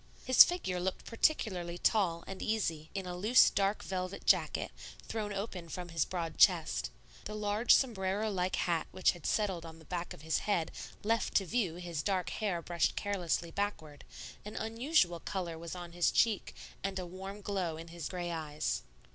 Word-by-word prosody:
His 255 -1 +10
figure 190 - -2
looked 185 +1 -3
particularly 185 - 0
tall 175 -4 +2
and 195 -1 -7
easy 165 -8 -1
in 195 -1 -2
a 180 -1 -4
loose 215 +8 +6
dark 200 +1 +1
velvet 185 0 -4
jacket, - - +2 0.4
thrown 215 -2 -3
open 195 -4 -5
from 180 +1 -6
his 165 -2 +1
broad 170 -3 -4
chest; 60 0 +4 0.4
the 210 - -5
large 210 +2 +4
sombrero 210 -3 0
like 185 -1 0
hat 170 -2 0
which 185 - +3
had 175 -4 -6
settled 195 -6 0
on 165 -1 -9
the 160 - -16
back 175 0 -4
of 150 - -9
his 160 0 +1
head 175 -6 0 0.3
left 225 +1 0
to 195 - +4
view 190 -4 0
his 175 -3 -4
dark 185 -1 0
hair 185 -6 -2
brushed 170 -1 +1
carelessly 175 -4 -1
backward; 160 -8 -3 0.4
an 210 - -8
unusual 225 - +1
color 175 -2 -4
was 165 +2 -7
on 175 -1 -7
his 175 0 +2
cheek, 225 -3 +1 0.3
and 195 0 -2
a 185 - -3
warm 190 +3 -7
glow 185 -6 -2
in 165 +1 -9
his 170 -1 -6
gray 175 -2 -3
eyes. 150 - -2
185 Hz, 180 wpm, -33 LUFS, 170-205 Hz, 0.4 s, His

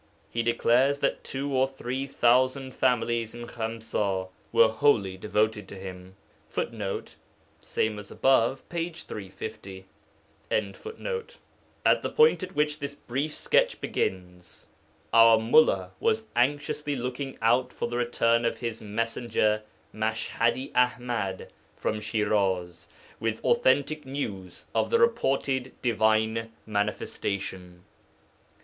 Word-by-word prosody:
He 115 - 0
declares 120 +4 +3
that - - -1
two 140 +1 -3
or 130 +1 +4
three 135 0 -4
thousand 130 +1 +2
families 120 -2 +1
in 120 0 -7
Khamsa 110 -5 -2 0.2
were 115 - +6
wholly 110 -5 +2
devoted 105 +1 0
to - - -9
him. 95 -1 -9 0.3
[Footnote: 105 -4 -4 0.4
Ibid. 115 +4 +1
p. 170 0 -2
350.] 95 - -8 0.6
At 455 - -2
the - - -2
point 465 - +4
at 185 +1 -6
which 150 0 +1
this 140 0 -5
brief 140 +4 -3
sketch - - +2
begins, 90 -3 -4 0.5
our 115 0 +8
mullā 110 -5 +4
was 225 -1 +1
anxiously 145 +3 0
looking 130 +2 -4
out 120 +3 +2
for - - -3
the 120 0 -3
return 115 -1 +2
of 115 - 0
his 115 -2 -4
messenger 110 0 0 0.3
Mash 110 +1 -2
hadi 120 +3 0
Aḥmad 120 -6 0 0.3
from 105 0 -2
Shiraz 100 -6 0 0.3
with 115 -1 -1
authentic 150 - +2
news 100 -10 -5
of - - +1
the 465 - +4
reported 135 - +1
Divine 110 -1 +2
Manifestation. 95 -3 -3
115 Hz, 110 wpm, -27 LUFS, 105-135 Hz, 0.6 s, our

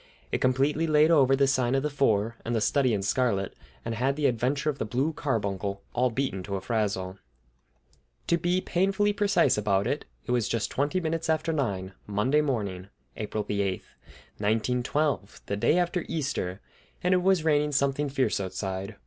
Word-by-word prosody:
It - - -1
completely 140 +5 +2
laid 155 +1 +4
over 135 -4 +5
"The 140 0 +3
Sign 130 -2 +1
of 135 - +1
the 150 - 0
Four" 115 -5 +1
and 120 +1 -2
"The - - +2
Study 130 +3 +2
in 100 -3 0
Scarlet," 100 -3 0 0.3
and 115 - -2
had 130 +5 0
"The 150 0 -1
Adventure 135 +5 +1
of 140 - -12
the - - 0
Blue 130 +8 -1
Carbuncle" 100 -8 -2
all 125 +1 +2
beaten 120 -6 -2
to 100 +2 -4
a - - -1
frazzle. 100 -4 -2 1.1
To 170 - +2
be 175 +2 +1
painfully 195 +4 +1
precise 200 - +3
about 100 -2 +1
it, - - -2 0.2
it - - -3
was 120 -3 +1
just 115 -2 -1
twenty 145 +7 0
minutes 165 -1 -2
after 160 +1 +1
nine, 100 -10 -2
Monday 105 +9 +2
morning, 100 -10 -2 0.3
April 105 0 -3
the 100 0 -1
eighth, 95 -2 -3 0.5
1912, 125 +4 0
the 100 - -2
day 115 - +2
after 175 -1 0
Easter, 130 - -2 0.4
and 180 +1 +3
it 180 - +3
was 185 -3 +3
raining 150 -1 +3
something 140 +1 +1
fierce 130 -6 0
outside. 95 +1 -4
130 Hz, 180 wpm, -27 LUFS, 105-150 Hz, 1.1 s, over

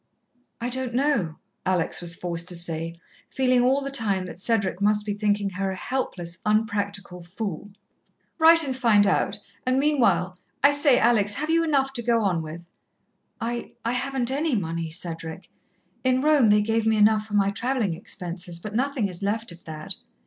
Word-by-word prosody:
"I 235 +1 -2
don't 255 -1 -2
know," 250 - +1 0.3
Alex 185 -3 +1
was 170 -1 0
forced 170 -1 -3
to 180 - -2
say, 165 -1 -1 0.3
feeling 255 -2 +2
all 265 +3 +3
the 275 0 -4
time 205 -8 0
that 180 - -9
Cedric 200 -3 0
must 210 0 +2
be 205 - -1
thinking 205 -1 0
her 195 +1 -2
a 190 - -3
helpless, 185 -6 -4
unpractical 205 -3 -1
fool. 195 +1 -6 0.7
"Write 325 +1 +7
and 265 -3 -2
find 225 -5 +4
out. - - +1 0.3
And 255 +1 +1
meanwhile 200 - +2 0.2
I 285 - +7
say, 285 -3 +4
Alex, 210 -4 +3
have 305 +3 -2
you 330 0 +3
enough 275 -4 +1
to 245 - -1
go 230 -1 +2
on 180 -5 +1
with?" 160 +2 -8 0.8
"I 235 +1 -3 0.2
I 230 - +1
haven't 255 0 -1
any 290 0 0
money, 165 -4 -2
Cedric. 165 -1 -4 0.5
In 255 0 +2
Rome 295 -6 +4
they 210 0 +5
gave 225 +1 0
me 220 -1 +3
enough 215 0 +4
for 210 - -4
my 200 -1 +3
travelling 235 -3 -1
expenses, 175 0 -5
but 210 +5 -8
nothing 255 -2 0
is 180 -1 -4
left 215 +1 -2
of 170 0 -14
that." 155 -1 -5
210 Hz, 180 wpm, -25 LUFS, 180-255 Hz, 0.8 s, Write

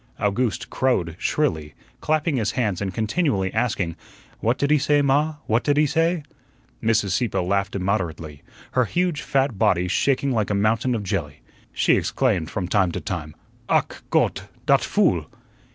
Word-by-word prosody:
Owgooste 115 +3 -1
crowed 90 -11 0
shrilly, 80 - -1 0.2
clapping 155 -1 0
his 110 -3 0
hands 105 -8 -1
and 95 -2 -2
continually 110 - 0
asking, 105 -7 -1 0.4
"What 115 +3 +1
did 140 +1 0
he 150 - +5
say, 145 0 +2
ma? 145 +3 +2
What 115 +2 +1
did 145 -1 +1
he 150 - +5
say?" 165 +2 +1 0.6
Mrs. 110 -3 +1
Sieppe 100 +2 0
laughed 100 +2 0
immoderately, 85 -6 -2 0.3
her 125 -1 +2
huge 175 - -1
fat 135 -6 0
body 90 0 +2
shaking 135 +8 +1
like 110 -4 0
a 105 - 0
mountain 110 +5 +1
of 110 - -3
jelly. 85 -7 -3 0.3
She - - +3
exclaimed 100 -12 0
from 90 -3 -3
time 95 -2 +2
to - - -2
time, 75 0 -5 0.3
"Ach, - - +1
Gott, - - +1 0.2
dot - - +4
fool!" - - +1
110 Hz, 160 wpm, -23 LUFS, 95-140 Hz, 0.6 s, he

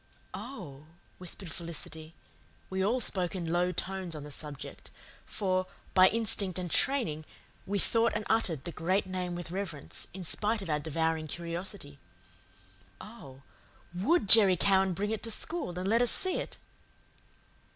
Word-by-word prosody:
"Oh," 150 - -8 0.3
whispered 180 -1 -5
Felicity 160 -1 -7 0.6
we 190 0 0
all 230 +6 +2
spoke 185 -6 +1
in 170 -2 -2
low 180 +1 +2
tones 185 -1 -2
on 150 - -6
the 150 - -9
subject, 145 -1 -7 0.4
for, 185 -2 0 0.3
by 185 0 +8
instinct 205 -5 +1
and 180 -2 -4
training, 230 - +2 0.4
we 200 +1 0
thought 230 +3 +2
and 215 0 -2
uttered 175 - +1
the 170 - -5
Great 185 +5 0
Name 180 -1 -3
with 175 -1 -6
reverence, 180 -7 -3
in 185 0 -7
spite 210 +5 0
of 170 - -4
our 150 - +1
devouring 160 +1 -1
curiosity 170 -2 -6 1.0
"oh, 140 - -12 0.5
WOULD 210 - +2
Jerry 195 -3 +9
Cowan 190 0 +3
bring 205 +4 -2
it 220 - -2
to 230 - -4
school 225 - -4
and 185 +1 -2
let 230 +4 +3
us 245 - +4
see 375 - +2
it?" - - -5
185 Hz, 150 wpm, -30 LUFS, 165-205 Hz, 1.0 s, Jerry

